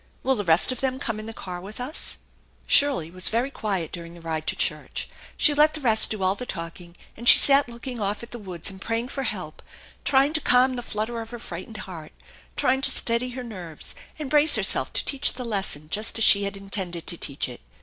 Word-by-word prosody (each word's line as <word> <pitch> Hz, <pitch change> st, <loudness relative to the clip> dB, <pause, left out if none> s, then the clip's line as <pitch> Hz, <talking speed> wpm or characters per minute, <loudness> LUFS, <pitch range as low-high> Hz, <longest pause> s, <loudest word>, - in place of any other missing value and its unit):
Will 265 Hz, -, +2 dB
the 210 Hz, -5 st, -2 dB
rest 170 Hz, +5 st, +4 dB
of 255 Hz, -, -4 dB
them 260 Hz, -1 st, -1 dB
come 230 Hz, -5 st, -4 dB
in 215 Hz, -, -8 dB
the -, -, -5 dB
car 180 Hz, -5 st, -8 dB
with 205 Hz, +5 st, -9 dB
us? 260 Hz, +6 st, -3 dB, 0.2 s
" -, -, -35 dB
Shirley 265 Hz, -, +3 dB
was 185 Hz, +1 st, -4 dB
very 240 Hz, +5 st, -1 dB
quiet 195 Hz, -, -3 dB
during 170 Hz, -1 st, -8 dB
the -, -, -12 dB
ride 160 Hz, -1 st, -4 dB
to -, -, 0 dB
church. -, -, -3 dB, 0.3 s
She 300 Hz, -, +4 dB
let 300 Hz, +2 st, +4 dB
the -, -, -5 dB
rest 225 Hz, -6 st, +5 dB
do 210 Hz, -3 st, -4 dB
all 185 Hz, 0 st, +2 dB
the 225 Hz, -, -7 dB
talking, 170 Hz, 0 st, -7 dB, 0.2 s
and 235 Hz, +2 st, +4 dB
she -, -, +10 dB
sat 280 Hz, -2 st, +4 dB
looking 235 Hz, 0 st, -7 dB
off 205 Hz, +3 st, -2 dB
at 235 Hz, -, -11 dB
the 240 Hz, -, -7 dB
woods 185 Hz, -3 st, -3 dB
and 190 Hz, 0 st, -13 dB
praying 230 Hz, +3 st, -2 dB
for 275 Hz, -, -4 dB
help, -, -, -5 dB, 0.4 s
trying 275 Hz, +2 st, +3 dB
to 315 Hz, -, +1 dB
calm 255 Hz, 0 st, +3 dB
the 245 Hz, -, -4 dB
flutter 230 Hz, +1 st, -4 dB
of 225 Hz, -, -9 dB
her 240 Hz, -, -7 dB
frightened 215 Hz, 0 st, -8 dB
heart, 165 Hz, -5 st, -10 dB, 0.4 s
trying 265 Hz, +1 st, +1 dB
to -, -, +6 dB
steady 235 Hz, +2 st, 0 dB
her 255 Hz, -, -5 dB
nerves 180 Hz, -9 st, -7 dB, 0.2 s
and 295 Hz, -3 st, -6 dB
brace 300 Hz, +1 st, +7 dB
her -, -, 0 dB
self -, -, +1 dB
to -, -, 0 dB
teach 275 Hz, -2 st, +3 dB
the 250 Hz, -1 st, -6 dB
lesson 195 Hz, -9 st, -2 dB
just 215 Hz, +3 st, +1 dB
as 225 Hz, -, +2 dB
she 200 Hz, -1 st, +7 dB
had 200 Hz, 0 st, -3 dB
intended 190 Hz, -4 st, -3 dB
to 175 Hz, -, +4 dB
teach 145 Hz, -4 st, 0 dB
it. 125 Hz, -, -10 dB
220 Hz, 240 wpm, -24 LUFS, 185-255 Hz, 0.4 s, she